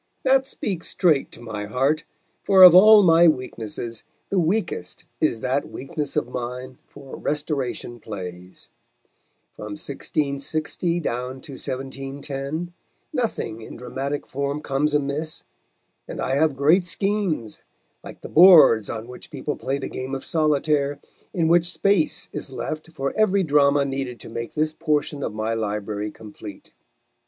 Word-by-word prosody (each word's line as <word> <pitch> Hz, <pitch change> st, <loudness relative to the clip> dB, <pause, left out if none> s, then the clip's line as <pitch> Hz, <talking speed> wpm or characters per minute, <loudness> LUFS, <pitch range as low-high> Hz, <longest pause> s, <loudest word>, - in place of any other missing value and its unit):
That 265 Hz, 0 st, +3 dB
speaks 185 Hz, -9 st, -3 dB
straight 160 Hz, -7 st, +2 dB
to -, -, -12 dB
my 110 Hz, -3 st, -5 dB
heart; 135 Hz, +8 st, 0 dB, 0.4 s
for 190 Hz, -2 st, +7 dB
of 180 Hz, -2 st, +11 dB
all 210 Hz, +3 st, +9 dB
my 170 Hz, -1 st, +6 dB
weaknesses 115 Hz, -5 st, -2 dB, 0.3 s
the 195 Hz, -, +1 dB
weakest 185 Hz, +6 st, -2 dB
is 120 Hz, -8 st, +1 dB
that 130 Hz, +2 st, -1 dB
weakness 145 Hz, +1 st, -5 dB
of -, -, 0 dB
mine 125 Hz, +1 st, -6 dB
for 140 Hz, -2 st, -11 dB
Restoration 140 Hz, -5 st, -3 dB
plays. 90 Hz, -4 st, -9 dB, 0.9 s
From 105 Hz, -1 st, -7 dB
1660 155 Hz, +4 st, -2 dB
down 125 Hz, -1 st, -3 dB
to 140 Hz, -, -11 dB
1710 135 Hz, +4 st, -5 dB, 0.4 s
nothing 215 Hz, -, -2 dB
in -, -, -9 dB
dramatic 135 Hz, +4 st, -4 dB
form 140 Hz, +2 st, -3 dB
comes 145 Hz, +2 st, 0 dB
amiss, 150 Hz, +2 st, -2 dB, 0.6 s
and -, -, -7 dB
I 130 Hz, -, -1 dB
have 150 Hz, 0 st, +2 dB
great 155 Hz, +7 st, +4 dB
schemes, 185 Hz, -, -1 dB, 0.4 s
like -, -, -11 dB
the -, -, -7 dB
boards 155 Hz, -, +7 dB
on 115 Hz, 0 st, -5 dB
which 125 Hz, 0 st, -11 dB
people 145 Hz, -1 st, -4 dB
play 135 Hz, +1 st, -2 dB
the 140 Hz, -, -5 dB
game 130 Hz, +1 st, -5 dB
of 135 Hz, -, -7 dB
solitaire, 150 Hz, -2 st, +1 dB, 0.3 s
in 165 Hz, -3 st, 0 dB
which 170 Hz, +1 st, +3 dB
space 195 Hz, -5 st, +1 dB
is -, -, -5 dB
left 155 Hz, +4 st, -5 dB
for 135 Hz, -3 st, -3 dB
every 200 Hz, -3 st, +3 dB
drama 145 Hz, -2 st, +3 dB
needed 135 Hz, -3 st, -4 dB
to -, -, -8 dB
make 115 Hz, +1 st, -6 dB
this 155 Hz, 0 st, 0 dB
portion 150 Hz, -2 st, -1 dB
of -, -, -2 dB
my 110 Hz, +1 st, -1 dB
library 105 Hz, -1 st, -3 dB
complete. 105 Hz, -1 st, -11 dB
140 Hz, 145 wpm, -23 LUFS, 125-160 Hz, 0.9 s, of